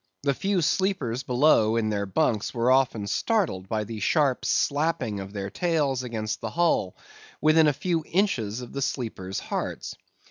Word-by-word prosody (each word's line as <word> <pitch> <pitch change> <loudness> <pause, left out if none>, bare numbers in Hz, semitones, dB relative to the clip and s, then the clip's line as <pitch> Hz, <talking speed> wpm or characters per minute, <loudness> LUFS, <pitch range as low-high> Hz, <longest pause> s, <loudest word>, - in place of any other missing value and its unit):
The 140 -1 +2
few 195 +4 0
sleepers 150 - 0
below 125 -4 +3
in 110 -2 +1
their 100 -1 -1
bunks 105 +5 0
were 120 +2 +2
often 130 -5 +2
startled 100 - 0
by 110 -1 -1
the 110 +1 -7
sharp 140 - +1
slapping 145 -8 0
of 95 0 -7
their 100 -1 -5
tails 150 -7 0
against 115 -3 -4
the - - -3
hull, 165 - +1 0.4
within 155 +1 +5
a - - +5
few 165 +3 -1
inches 125 - 0
of 120 - -9
the 140 - -3
sleepers' 110 -9 -3
hearts. - - -4
125 Hz, 165 wpm, -26 LUFS, 110-155 Hz, 0.4 s, within